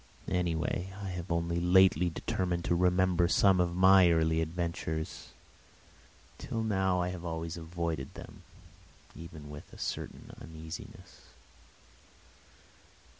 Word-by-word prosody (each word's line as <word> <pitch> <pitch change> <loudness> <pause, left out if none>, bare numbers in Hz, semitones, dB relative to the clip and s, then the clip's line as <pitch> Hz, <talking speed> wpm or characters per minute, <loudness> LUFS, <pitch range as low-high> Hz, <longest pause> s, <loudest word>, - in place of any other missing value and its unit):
Anyway, 90 +1 -1
I 100 -1 -5
have 90 -1 -6
only 85 0 0
lately 90 -1 +5
determined 90 +1 -2
to - - +1
remember 90 0 +3
some 95 0 +4
of 85 -1 -1
my 95 0 +7
early 80 -1 +2
adventures. 80 -1 -4 1.1
Till 115 - -3
now 95 -4 +1
I 90 0 0
have 90 -1 -6
always 80 -1 -4
avoided 85 -4 -4
them, - - -11 0.7
even 80 -3 -10
with 75 0 -11
a - - -13
certain - - -5
uneasiness. 80 0 -10
85 Hz, 115 wpm, -31 LUFS, 80-90 Hz, 1.1 s, my